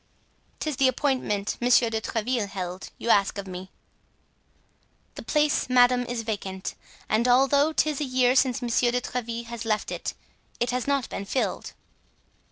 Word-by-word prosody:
"'Tis 305 -4 -3
the 270 - +4
appointment 255 -6 0
Monsieur 240 -1 +4
de 220 0 -1
Tréville 225 -1 -1
held, 185 -1 -5
you - - -7
ask 200 0 +3
of 200 - -4
me." 185 0 -8 1.4
"The - - -8
place, 300 -3 +1
madame, 245 0 +4
is 235 -1 -3
vacant, 195 -4 -4 0.3
and 225 +3 +2
although 275 +4 +4
'tis 305 -2 0
a - - 0
year 255 -1 +2
since 255 -2 +2
Monsieur 240 0 +2
de 245 +1 +1
Tréville 235 -2 -4
has 235 0 -6
left 215 -2 -1
it, - - -4 0.4
it 240 +1 0
has 250 +1 -2
not 280 -3 +1
been 200 - -5
filled." 255 - -2
245 Hz, 160 wpm, -26 LUFS, 215-255 Hz, 1.4 s, the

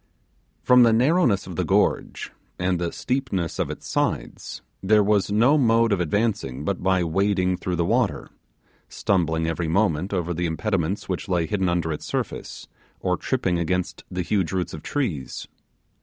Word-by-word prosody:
From 125 0 +6
the 115 -2 +6
narrowness 125 - +3
of 90 -3 -8
the - - +1
gorge, - - 0 0.3
and 90 -1 0
the 85 -1 -2
steepness 125 - -2
of - - 0
its - - -7
sides, - - -2 0.2
there 105 +2 +4
was 100 -2 +2
no 125 +9 +4
mode 115 -2 +3
of 100 - +2
advancing 90 - -1
but 100 +1 -2
by 95 -1 +2
wading 95 +1 +1
through 90 0 -3
the 85 0 0
water; - - 0 0.6
stumbling 80 -4 0
every 80 +1 -2
moment 90 0 +1
over 90 -3 -1
the 85 +1 -1
impediments 95 +2 -1
which 95 +1 -4
lay 85 -3 +1
hidden 95 -1 0
under 85 -2 0
its 75 - -7
surface, - - -4 0.3
or - - 0
tripping 90 -2 -1
against 90 +1 -2
the 90 0 -3
huge 95 -1 0
roots 90 -3 -2
of 80 - -7
trees. 90 - -3
95 Hz, 165 wpm, -24 LUFS, 85-105 Hz, 0.6 s, From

